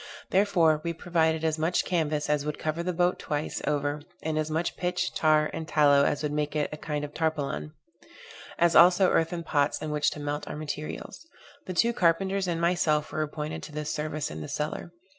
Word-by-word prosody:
Therefore, 175 -6 +3
we 170 - -2
provided 160 -1 0
as 160 -1 0
much 165 +3 +1
canvas 155 -4 0
as 150 -1 +1
would 150 0 -3
cover 155 +2 -2
the 180 +1 -1
boat 175 +1 +1
twice 150 +1 -3
over, 145 0 0 0.2
and 155 0 -1
as 155 0 -1
much 160 +2 -1
pitch, 180 0 -1
tar 155 -1 +3
and 160 -1 -5
tallow, 145 -3 +5
as 145 - 0
would 150 - -1
make 150 0 -2
it 150 -1 0
a - - -5
kind 150 -1 -3
of 145 - -10
tarpaulin; 145 - -2 0.8
as 170 0 +3
also 180 +2 +7
earthen 165 +1 +1
pots 145 -3 +1
in 155 - -4
which 150 0 +2
to - - -8
melt 145 0 -3
our - - -5
materials. 155 - -6 0.4
The 185 - -4
two 235 +6 +3
carpenters 190 +1 +1
and 170 -2 -1
myself 170 -3 +1
were 155 - -2
appointed 150 0 -4
to 155 - -10
this 150 0 -3
service 150 - -3
in 80 +1 -6
the 75 - -6
cellar. 150 +3 -4
155 Hz, 200 wpm, -27 LUFS, 150-170 Hz, 0.8 s, also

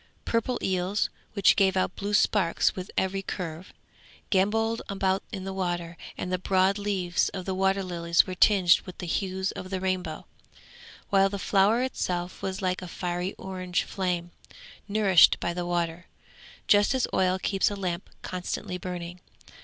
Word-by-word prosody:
Purple 230 +2 0
eels, 185 +2 0 0.2
which 200 -2 +5
gave 190 -2 +3
out 185 - 0
blue 205 +1 -1
sparks 195 -5 +2
with 185 0 -6
every 190 +1 0
curve, 175 -2 -6 0.6
gambolled 225 +4 +2
about 195 -1 0
in 190 - -5
the 195 0 -4
water; 175 -3 -2 0.2
and 180 - -3
the 185 - 0
broad 190 +2 +2
leaves 190 -4 0
of 185 -2 -5
the 190 - -2
water 195 +1 +1
lilies 170 -2 +2
were 185 - -5
tinged 185 -2 +5
with 180 - -9
the - - -5
hues 190 +2 -1
of 185 - -7
the 190 -1 -2
rainbow, 185 -1 -2 0.9
while 195 0 +5
the 200 - -4
flower 205 +5 +3
itself 180 -8 -3
was 190 0 -4
like 185 0 0
a 180 - -6
fiery 180 +1 -3
orange 185 -1 -2
flame, 180 -2 -2 0.6
nourished 200 -4 +5
by 170 - -2
the 175 0 -3
water, 175 0 -2 0.6
just 205 +5 +4
as 260 - +2
oil 185 0 +2
keeps 195 +1 +1
a 205 - -4
lamp 185 -2 -3
constantly 180 0 -4
burning. 180 -1 -6
185 Hz, 160 wpm, -27 LUFS, 180-195 Hz, 0.9 s, which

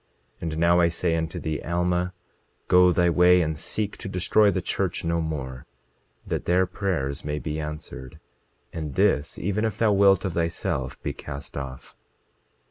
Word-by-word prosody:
And 80 -2 -3
now 85 +1 +4
I 85 - +5
say 85 0 0
unto 80 -1 -2
thee, 80 -1 -3
Alma, 90 +1 0 0.5
go 90 0 +6
thy 85 0 +3
way, 90 +1 +5
and 80 0 -2
seek 105 +6 -4
to - - -7
destroy 100 +3 +3
the 95 - 0
church 90 0 -2
no 85 0 +1
more, 70 -5 -5 0.6
that - - -3
their 90 +2 +3
prayers 90 -8 -2
may 75 0 -2
be 75 0 -4
answered, 75 -4 -7 0.5
and 75 -4 -5
this 95 -7 +2
even 100 +3 -1
if 110 -1 -1
thou 110 -2 +3
wilt 100 -1 +4
of 95 - -2
thyself 75 -6 -2
be - - -2
cast 70 -1 -8
off. 65 -2 -7
85 Hz, 165 wpm, -25 LUFS, 75-90 Hz, 0.6 s, go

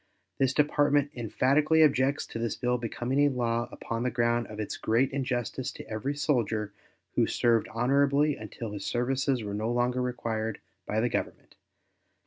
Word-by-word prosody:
This 135 -1 +3
Department 145 -1 +2
emphatically 140 +7 +3
objects 140 -1 +2
to 115 - -7
this 115 -2 -1
bill 125 0 0
becoming 120 +3 -2
a 145 0 +5
law 120 -2 -1
upon 115 0 -4
the 125 - +1
ground 120 0 +1
of 105 0 -9
its 105 - -3
great 120 +4 +1
injustice 130 -2 -2
to - - -10
every 130 +7 -3
soldier 110 -8 0 0.4
who - - +2
served 115 -2 +2
honorably 140 +5 +2
until 110 +1 -7
his 100 -1 -6
services 130 0 0
were 100 -1 -4
no 110 +2 -2
longer 125 +1 +1
required 115 -3 -2 0.3
by 110 +1 0
the 120 - +1
Government. - - -4
120 Hz, 160 wpm, -28 LUFS, 115-135 Hz, 0.4 s, a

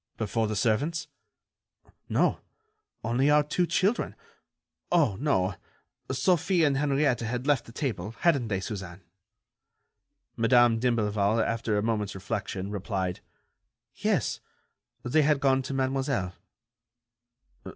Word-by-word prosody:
"Before 110 +1 -1
the 110 - -2
servants?" 135 +9 0 1.0
"No, - - +2 0.6
only 120 +5 +2
our 150 0 +5
two 170 +4 0
children. 200 +7 0 0.8
Oh, 155 - +3
no... 105 -10 +1 0.6
Sophie 175 +4 +2
and 145 -3 +3
Henriette 140 -2 +2
had 120 +2 -3
left 140 -5 +2
the - - -12
table, 115 - -4
hadn't 140 -9 +3
they, 100 -3 -1
Suzanne?" 95 -3 -6 1.3
Madame 120 0 +4
d'Imblevalle, 110 -3 +1
after 115 -2 -1
a 105 - 0
moment's 105 -3 -1
reflection, 95 -1 -4
replied: 95 -3 -3 0.7
"Yes, - - 0 0.6
they 140 +6 +3
had 150 -1 +3
gone 135 -1 +3
to 135 +1 -5
Mademoiselle." 130 -8 -1
120 Hz, 110 wpm, -28 LUFS, 105-140 Hz, 1.3 s, our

